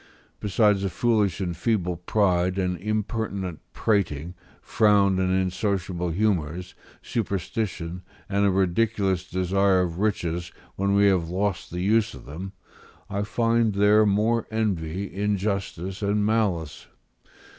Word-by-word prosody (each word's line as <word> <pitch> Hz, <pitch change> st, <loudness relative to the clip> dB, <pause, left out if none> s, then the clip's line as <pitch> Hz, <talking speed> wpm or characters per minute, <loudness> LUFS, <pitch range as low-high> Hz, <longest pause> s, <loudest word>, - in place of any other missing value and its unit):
Besides 105 Hz, -1 st, +2 dB
a 95 Hz, -, 0 dB
foolish 105 Hz, -3 st, +1 dB
and 90 Hz, -2 st, -2 dB
feeble 90 Hz, -1 st, 0 dB
pride, 90 Hz, 0 st, +1 dB
an 90 Hz, -1 st, 0 dB
impertinent 100 Hz, -3 st, -3 dB
prating, 90 Hz, -6 st, 0 dB, 0.3 s
froward 100 Hz, -3 st, +3 dB
and 95 Hz, 0 st, +1 dB
insociable 95 Hz, -1 st, -1 dB
humours, 90 Hz, -3 st, -1 dB, 0.3 s
superstition, 95 Hz, -5 st, -3 dB, 0.3 s
and 100 Hz, 0 st, +1 dB
a 100 Hz, -, +4 dB
ridiculous 95 Hz, 0 st, +1 dB
desire 95 Hz, +1 st, +2 dB
of 85 Hz, -1 st, -2 dB
riches 85 Hz, -5 st, -1 dB, 0.2 s
when 100 Hz, +1 st, +1 dB
we 100 Hz, 0 st, +5 dB
have 90 Hz, -4 st, +2 dB
lost 95 Hz, +1 st, -2 dB
the 90 Hz, +1 st, -4 dB
use 110 Hz, +3 st, +2 dB
of -, -, -12 dB
them, 90 Hz, +8 st, -7 dB, 0.6 s
I 100 Hz, 0 st, -1 dB
find 115 Hz, 0 st, +1 dB
there 105 Hz, +1 st, +5 dB
more 110 Hz, +3 st, +1 dB
envy, 100 Hz, -4 st, -2 dB
injustice, 100 Hz, -2 st, -2 dB
and 105 Hz, 0 st, +1 dB
malice. 100 Hz, -9 st, -1 dB
95 Hz, 125 wpm, -25 LUFS, 90-105 Hz, 0.6 s, we